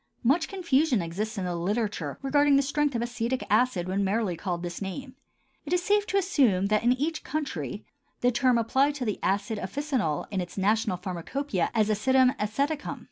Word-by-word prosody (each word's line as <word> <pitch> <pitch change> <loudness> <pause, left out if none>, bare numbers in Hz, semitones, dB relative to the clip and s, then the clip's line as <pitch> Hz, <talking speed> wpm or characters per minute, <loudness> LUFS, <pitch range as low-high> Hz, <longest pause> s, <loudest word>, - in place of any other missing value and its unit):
Much 310 +7 +3
confusion 320 - +1
exists 200 +6 -3
in 190 - -2
the 175 -1 -2
literature 195 -4 -2
regarding 285 +1 +4
the 275 - +4
strength 285 0 0
of 235 - 0
acetic 240 +1 -2
acid 225 -9 +2
when 195 +2 0
merely 200 -2 0
called 175 -1 -3
by - - -2
this 175 +1 -6
name. 255 +7 -5 0.5
It 310 - -3
is 355 0 +2
safe 410 +2 +2
to 400 - +1
assume 265 - +3
that, 215 0 +3
in 240 +1 +4
each 305 +5 -2
country, 210 - -4 0.4
the 245 - +3
term 245 0 +3
applies 265 +5 +2
to 265 -4 -3
the 210 -3 -2
acid 205 +2 0
officinal 235 - -2
in 195 -2 -1
its 175 +2 -8
national 210 0 +1
pharmacopœia 185 - -2
as 215 -2 +3
"Acidum 255 +4 +3
Aceticum." 280 +8 -2
235 Hz, 190 wpm, -27 LUFS, 195-280 Hz, 0.5 s, regarding